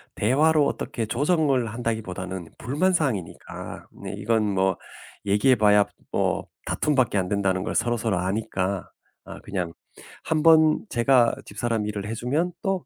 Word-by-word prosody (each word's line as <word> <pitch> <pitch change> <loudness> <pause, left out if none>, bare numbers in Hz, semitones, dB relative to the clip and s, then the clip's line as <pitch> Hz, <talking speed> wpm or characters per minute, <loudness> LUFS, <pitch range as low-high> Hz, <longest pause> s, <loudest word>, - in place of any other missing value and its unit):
대화로 145 +7 +3
어떻게 115 -4 -3
조정을 140 - +1
한다기 115 0 -2
보다는 90 -2 -6
불만사항이니까 140 - -2 0.2
네 - - -5
이건 110 0 +1
뭐 95 -1 +2 0.5
얘기해 105 +6 +4
봐야 105 -2 +5 0.3
뭐 - - 0 0.2
다툼밖에 130 -8 +1
안 90 - -1
된다는 95 -2 0
걸 - - -4
서로서로 115 -4 0
아니까 95 0 -2 0.3
아 - - -10
그냥 90 -5 -4 0.5
1 155 -1 0
번 160 +1 +5
제가 120 -1 +3
집사람 110 +1 -2
일을 105 -1 -4
해 110 - -3
주면 150 +10 -1
또 195 -2 -1
115 Hz, 295 characters per minute, -25 LUFS, 100-140 Hz, 0.5 s, 봐야